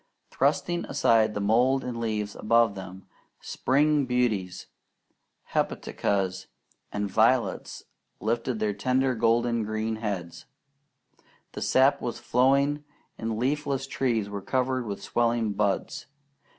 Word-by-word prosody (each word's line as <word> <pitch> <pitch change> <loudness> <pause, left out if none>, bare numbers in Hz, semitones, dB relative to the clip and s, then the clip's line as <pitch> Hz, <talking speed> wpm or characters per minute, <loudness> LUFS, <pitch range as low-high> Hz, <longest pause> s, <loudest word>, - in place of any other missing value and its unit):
Thrusting 165 +5 0
aside 110 -6 +2
the - - -1
mold 125 +6 +2
and 120 -2 -4
leaves 105 -3 -2
above 115 -1 +3
them, 95 -1 -9 0.3
spring 145 +1 +1
beauties, 110 -8 -1 0.9
hepaticas, 95 -2 -1 0.4
and 105 0 -2
violets 115 +5 +1 0.4
lifted 110 -2 -1
tender 130 +3 +2
golden 115 0 +2
green 110 +1 -2
heads. 90 -6 -5 1.1
The - - -7
sap 135 +2 +3
was 120 - -3
flowing, 140 +4 +2 0.4
and 110 -1 -2
leafless 135 +2 -1
trees 120 -6 -1
were 100 -1 -5
covered 130 +2 -1
with 100 -1 -5
swelling 115 -2 0
buds. 100 +4 -1
115 Hz, 110 wpm, -27 LUFS, 105-130 Hz, 1.1 s, above